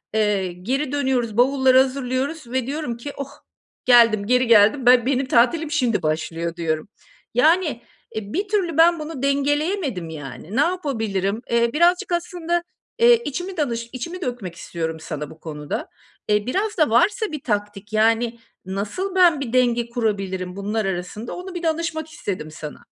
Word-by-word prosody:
Eee, 200 -4 +1
geri 255 +10 -2
dönüyoruz, 260 -6 0
bavulları 265 0 +4
hazırlıyoruz 265 +3 -1
ve 260 -1 -1
diyorum 285 -5 -3
ki 280 +4 -7
"Oh, 280 0 -5 0.6
geldim, 230 -4 +6
geri 250 +1 +3
geldim. 225 +4 +5
Ben 245 -1 +6
benim 265 0 +1
tatilim 295 +6 +2
şimdi 250 -7 +1
başlıyor." 165 +2 -2
diyorum. 160 +1 -2 0.4
Yani, 305 0 +3 0.3
eee, 210 -1 -5
bir 400 +4 -1
türlü 380 -6 0
ben 335 +1 +5
bunu 305 -3 -6
dengeleyemedim 280 - 0
yani. 155 - -8
Ne 270 - +4
yapabilirim? 225 - -1
Eee, 235 0 +2
birazcık 355 +5 +3
aslında, 345 0 -1 0.4
eee, 475 0 +6
içimi 355 +6 -4
danış 235 -5 -2
içimi 340 +9 -6
dökmek 240 - -4
istiyorum 160 -1 -4
sana 150 -2 -6
bu 160 - -14
konuda. 150 -2 -5 0.4
Eee, 210 0 +2
biraz 405 - -1
da 310 -3 +3
varsa 410 - +2
bir 300 -3 -6
taktik, 205 -1 -3
yani 230 +2 +2 0.3
nasıl 215 - -3
ben 345 -5 +5
bir 245 -4 -4
denge 240 -2 +2
kurabilirim 195 -6 -2
bunlar 210 +2 -2
arasında, 195 +5 -4
onu 365 0 -8
bir 350 - -5
danışmak 320 -1 -1
istedim 180 - -5
sana. 155 -1 -9
245 Hz, 155 wpm, -22 LUFS, 205-310 Hz, 0.6 s, geldim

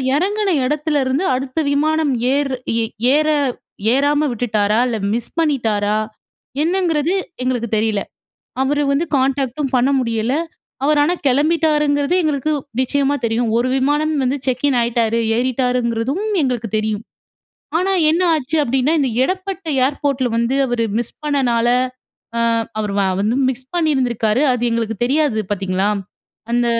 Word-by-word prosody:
இறங்குன 405 +5 0 0.2
இடத்துலருந்து 290 0 0
அடுத்த 260 +3 -3
விமானம் 310 +1 +1 0.2
ஏர் 280 -1 0 0.3
ஏ - - +1 0.3
ஏற 305 +1 +3 0.7
ஏறாம 290 +2 +2
விட்டுட்டாரா! 215 -2 0
இல்ல 230 - -1 0.2
மிஸ் 235 0 -3
பண்ணிட்டாரா 220 -10 +1 0.7
எண்ணங்கிறது 340 -2 +1 0.3
எங்களுக்கு 245 -3 -1
தெரியல. 215 -1 0 0.6
அவரு 290 +2 +1
வந்து 285 +4 +1
கான்டாக்ட் 265 -1 0
டும் 275 -3 -2
பண்ண 250 +2 +3
முடியல 230 0 -1 0.5
அவர் 300 +1 +3
ஆனா 330 +5 +2
கிளம்பிட்டாருங்கிறது 300 +1 +2
எங்களுக்கு 305 -1 0 0.3
நிச்சயமா 280 +2 +1
தெரியும். 230 +1 0
1 245 +2 +1
விமானம் 295 +4 +1
வந்து 260 +2 0
செக்கின் 260 +1 +1
ஆயிட்டாரு. 230 -1 +1 0.2
ஏறிட்டாருங்கிறதும் 250 - 0 0.2
எங்களுக்கு 245 -4 -1
தெரியும். 215 -1 -1 0.8
ஆனா 380 +2 +1 0.2
என்ன 335 +3 +1
ஆச்சு 305 +1 -1
அப்பிடின்னா 265 +3 +1
இந்த 270 - +1
இடப்பட்ட 375 +4 -3 0.2
ஏர்போர்ட்டில 275 -2 -1
வந்து, 235 +3 +1
அவர் 245 -2 -1 0.2
மிஸ் 240 -1 -3
பண்ணனால, 250 -5 +1 0.7
அ - - +1 0.4
அவர் 210 -2 -2
வ - - +3 0.2
வந்து 215 +4 +1
மிஸ் 260 0 -4
பண்ணியிருந்திருக்காரு. 255 -8 +1
அது 245 -1 -2
எங்களுக்கு 225 -1 -1
தெரியாது 280 -2 +1
பார்த்தீங்களா? 195 0 0 0.6
அந்த 240 0 +2
265 Hz, 130 wpm, -19 LUFS, 235-295 Hz, 0.8 s, ஏற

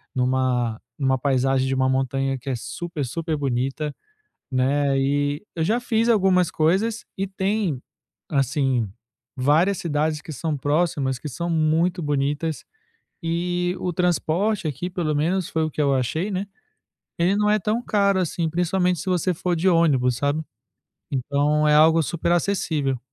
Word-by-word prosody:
numa 125 -3 0 0.2
numa 130 -1 +2
paisagem 135 0 +1
de 135 - 0
uma 130 0 +2
montanha 135 +1 0
que 135 - -7
é 130 - 0
super 155 +4 -5
super 160 +4 -3
bonita, 135 +2 -2 0.6
né. 135 +2 +2
E 145 +5 0
eu 160 - 0
já 220 +8 +1
fiz 230 -1 +1
algumas 185 -5 +3
coisas 195 +8 +1
e 195 - 0
tem, 190 - -1 0.5
assim, 135 - +1 0.5
várias 155 +9 +3
cidades 155 -1 -1
que 155 - -8
são 155 +1 -2
próximas, 145 -2 0
que 150 - -6
são 170 +6 -4
muito 165 +3 +1
bonitas. 145 +2 -1 0.6
E 175 +2 -1
o 180 - -2
transporte 180 +2 0
aqui, 155 +6 -3
pelo 160 -4 -1
menos 175 +4 0
foi 160 - 0
o 155 - -2
que 150 - -2
eu 140 -1 +3
achei, 155 - -1
né, 190 +2 -2 0.7
ele 175 +4 +2
não 210 0 +2
é 210 - +4
tão 215 +6 -1
caro 200 -2 +2
assim, 170 -2 -1
principalmente 180 +1 +1
se 190 - -4
você 180 0 +1
for 175 +1 -1
de 180 +4 +2
ônibus, 135 -8 +3
sabe? 145 +2 0 0.7
Então 145 +3 +1
é 150 - +5
algo 160 +2 +6
super 170 +4 -1
acessível. 160 -8 0
155 Hz, 155 wpm, -23 LUFS, 135-180 Hz, 0.7 s, algo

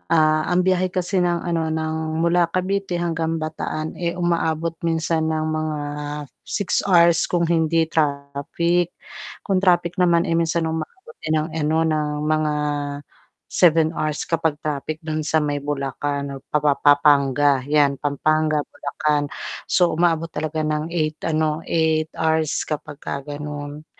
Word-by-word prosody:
Ah, 155 0 +4
ang 180 +1 +3
biyahe 185 0 +2
kasi 185 +1 0
ng, 175 -1 +1
ano, 165 -1 0
ng 160 0 -2 0.3
mula 170 0 +3
Cavite 190 0 -1
hanggang 165 -1 -1
Bataan, 155 0 -4
eh, 170 -1 -1
umaabot 165 -2 0
minsan 160 -1 0
ng 155 0 -1
mga 155 -1 -2 0.7
6 200 -3 0
hours 170 -2 +6
kung 175 -1 +1
hindi 165 -1 +2
traffic. 155 +4 0 0.5
Kung 195 - +1
traffic 175 -2 +3
naman, 170 -1 +4
eh, 165 - 0
minsan 165 0 +1
umaabot 370 - -6
din 155 - 0
ng, 155 +2 -3
ano, 155 +2 +1
ng 155 -1 0 0.2
mga 155 0 +1 1.0
7 165 -2 +4
hours 155 -1 -2
kapag 160 -2 0
traffic 150 +1 -2
don 155 0 -2
sa 155 +1 +1
may 145 -2 -1
Bulacan, 140 0 -3
o - - -15
pa-pa-pa-panga 145 -1 +3
yan, 145 -2 +3
Pampanga, 155 +2 +1
Bulacan. 145 0 -1 0.4
So, 175 -2 +3
umaabot 165 -1 +2
talaga 155 0 -2
ng 155 +1 -1
8, 155 -3 -2
ano, 155 -1 0
8 160 -1 +1
hours 160 -1 +1
kapag 150 -1 -5
ka 140 - -5
ganon. 145 +1 -7
155 Hz, 140 wpm, -22 LUFS, 150-170 Hz, 1.0 s, hours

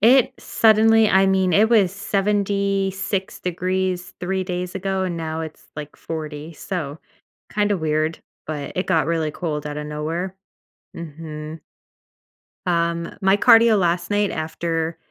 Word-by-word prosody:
It 245 +4 +5
suddenly 220 0 +4
I 190 +1 +5
mean, 190 -1 +2
it 210 +6 +5
was 205 -6 +4
76 200 -1 -1
degrees 185 0 -2
3 190 +1 -1
days 180 0 -4
ago, 190 0 -1
and 180 -2 -2
now 160 -1 -3
it's, 160 -1 -8
like, 150 0 -8
40. 155 -1 -6
So, 160 -3 -5 0.5
kinda 205 -1 +2
weird, 155 -1 -1 0.3
but 150 -2 -4
it 185 - -1
got 160 - +2
really 165 -2 0
cold 150 -3 -3
outta 150 0 -4
nowhere. 165 +5 -3 0.6
Mhm. 155 -1 -7 1.1
Um, 170 -1 0
my 195 +1 +4
cardio 230 -1 +6
last 175 0 0
night 205 -1 +1
after 165 +1 -2
180 Hz, 130 wpm, -22 LUFS, 160-195 Hz, 1.1 s, cardio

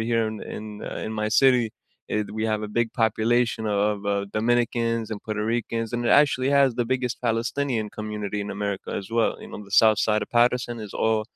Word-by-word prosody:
here 115 0 +1
in 110 -1 -6
in, 105 -1 -7
uh, - - -5
in 110 - -4
my 105 - 0
city, 125 +1 +4 0.5
eh, 105 - +1
th - - -11
we 110 - 0
have 110 0 -1
a - - -5
big 115 -1 +2
population 110 +1 +1
o 105 -1 0 0.2
of, 105 - -5 0.2
uh, 100 0 -1
Dominicans 115 0 +1
and 105 - -4
Puerto 105 -1 -2
Ricans, 115 -1 -3
and 120 0 -2
it - - +2
actually 140 -2 +4
has 140 -3 +4
the 120 - 0
biggest 125 -2 -1
Palestinian 115 0 -1
community 105 -1 -3
in 105 - -5
America 100 -2 -4
as 95 - -11
well, 115 - +3
you - - -10
know, - - -7
the 100 +1 -2
south 110 -1 +5
side 105 0 +2
of - - -25
Paterson 120 0 +2
is 100 - -12
all 110 -1 +2
110 Hz, 220 wpm, -25 LUFS, 105-120 Hz, 0.5 s, south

